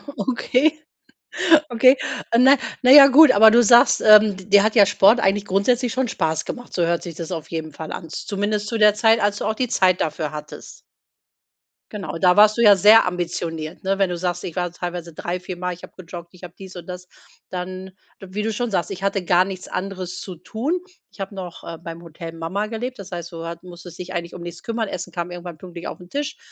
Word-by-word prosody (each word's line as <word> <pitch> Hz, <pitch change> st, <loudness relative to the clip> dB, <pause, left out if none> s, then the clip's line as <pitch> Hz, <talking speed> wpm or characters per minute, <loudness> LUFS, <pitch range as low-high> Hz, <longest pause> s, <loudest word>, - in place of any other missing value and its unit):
Okay. 275 Hz, +4 st, 0 dB, 0.9 s
Okay. 255 Hz, +3 st, +4 dB, 0.4 s
Na, 265 Hz, +3 st, +6 dB, 0.3 s
na 250 Hz, -, +5 dB
ja, 275 Hz, 0 st, +10 dB
gut, 285 Hz, +1 st, +7 dB
aber 220 Hz, +2 st, +7 dB
du 240 Hz, +2 st, +5 dB
sagst, 235 Hz, +2 st, +5 dB
ähm, 215 Hz, -2 st, +6 dB
d 190 Hz, -, -12 dB
dir 200 Hz, 0 st, +4 dB
hat 220 Hz, +2 st, 0 dB
ja 205 Hz, -3 st, +7 dB
Sport 205 Hz, +3 st, +4 dB
eigentlich 205 Hz, -1 st, 0 dB
grundsätzlich 235 Hz, +6 st, 0 dB
schon 260 Hz, +1 st, -1 dB
Spaß 160 Hz, -7 st, -2 dB
gemacht. 245 Hz, -, -8 dB
So 175 Hz, -, +1 dB
hört 170 Hz, 0 st, -1 dB
sich 170 Hz, -3 st, -8 dB
das 165 Hz, +1 st, -7 dB
auf 160 Hz, -3 st, -6 dB
jeden 160 Hz, -2 st, -6 dB
Fall 155 Hz, +1 st, -8 dB
an. 165 Hz, -, -7 dB
Zumindest 205 Hz, +4 st, -3 dB
zu 230 Hz, -, -3 dB
der 210 Hz, -1 st, +5 dB
Zeit, 225 Hz, +2 st, +3 dB
als 205 Hz, -1 st, 0 dB
du -, -, -4 dB
auch 220 Hz, -, -1 dB
die 250 Hz, +2 st, -1 dB
Zeit 185 Hz, -6 st, +2 dB
dafür 155 Hz, -1 st, -3 dB
hattest. 150 Hz, -, -10 dB, 1.1 s
Genau, 195 Hz, -5 st, -6 dB
da 180 Hz, +2 st, +3 dB
warst 210 Hz, +1 st, +5 dB
du -, -, +1 dB
ja 205 Hz, -3 st, +6 dB
sehr 215 Hz, +4 st, +6 dB
ambitioniert, 170 Hz, -1 st, -5 dB
ne? 195 Hz, +1 st, -1 dB
Wenn 195 Hz, -, +2 dB
du 175 Hz, -, -3 dB
sagst: 175 Hz, 0 st, -3 dB
„Ich 170 Hz, -, -7 dB
war 180 Hz, -1 st, -2 dB
teilweise 175 Hz, -1 st, -6 dB
drei 175 Hz, +3 st, -5 dB
viermal 180 Hz, 0 st, -5 dB
ich 175 Hz, -, -15 dB
habe -, -, -11 dB
gejoggt, 170 Hz, -1 st, -10 dB
ich 180 Hz, -, -18 dB
habe 175 Hz, -, -12 dB
dies 190 Hz, -1 st, -11 dB
und 175 Hz, -, -10 dB
das“, 180 Hz, 0 st, -9 dB, 0.4 s
dann 185 Hz, +1 st, -7 dB, 0.3 s
wie 195 Hz, +2 st, -5 dB
du 220 Hz, 0 st, -2 dB
schon 240 Hz, +2 st, -3 dB
sagst, 185 Hz, 0 st, -2 dB
„ich 195 Hz, 0 st, -7 dB
hatte 195 Hz, -2 st, -1 dB
gar 175 Hz, +1 st, +4 dB
nichts 185 Hz, -1 st, -8 dB
anderes 185 Hz, -2 st, -6 dB
zu 185 Hz, -, -8 dB
tun. 240 Hz, -, -3 dB, 0.3 s
Ich -, -, -22 dB
habe 195 Hz, +1 st, -6 dB
noch, 180 Hz, -3 st, -9 dB
äh, 165 Hz, -, -7 dB
beim 165 Hz, 0 st, -9 dB
Hotel 165 Hz, 0 st, -9 dB
Mama 165 Hz, +6 st, -4 dB
gelebt“, 245 Hz, +3 st, -6 dB
das 195 Hz, -1 st, -11 dB
heißt, 175 Hz, 0 st, -7 dB
du 165 Hz, -, -7 dB
hat 170 Hz, +1 st, -8 dB
musstest 175 Hz, -1 st, -12 dB
dich 185 Hz, +1 st, -7 dB
eigentlich 170 Hz, 0 st, -5 dB
um 175 Hz, -, -9 dB
nichts 175 Hz, -1 st, -9 dB
kümmern. 230 Hz, -1 st, -3 dB
Essen 180 Hz, -, -6 dB
kam 175 Hz, +1 st, -5 dB
irgendwann 175 Hz, -2 st, -9 dB
pünktlich 175 Hz, 0 st, -9 dB
auf -, -, -9 dB
'n 180 Hz, 0 st, -15 dB
Tisch, 290 Hz, +4 st, -4 dB
185 Hz, 225 wpm, -21 LUFS, 175-215 Hz, 1.1 s, ja